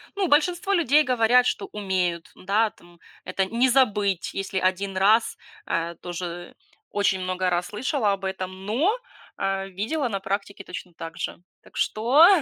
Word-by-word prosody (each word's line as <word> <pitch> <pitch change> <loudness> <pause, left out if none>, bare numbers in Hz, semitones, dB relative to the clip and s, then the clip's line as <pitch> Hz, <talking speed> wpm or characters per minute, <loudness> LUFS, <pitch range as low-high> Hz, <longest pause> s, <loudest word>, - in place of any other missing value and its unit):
Ну, 395 -2 +1
большинство 350 +6 +2
людей 305 -4 +4
говорят, 250 -1 +4
что 200 - -2
умеют, 185 -4 -1
да, 210 +4 +1
там 175 -3 -21 0.2
это 190 - -1
не 235 +6 +2
забыть, 210 -8 +2
если 195 -1 -2
1 190 +1 0
раз, 215 +4 +3 0.3
э, 170 +1 -2
тоже 175 0 -6 0.4
очень 195 -2 +1
много 185 0 -1
раз 175 0 0
слышала 215 0 0
об 195 -1 -3
этом, 190 0 -5
но, 300 - +2 0.4
э, 195 0 -1
видела 225 - -2
на 195 - -2
практике 200 +1 -4
точно 180 -1 -8
так 165 0 -8
же. - - -4 0.2
Так - - -20
что 255 +10 +5
195 Hz, 155 wpm, -25 LUFS, 185-245 Hz, 0.4 s, что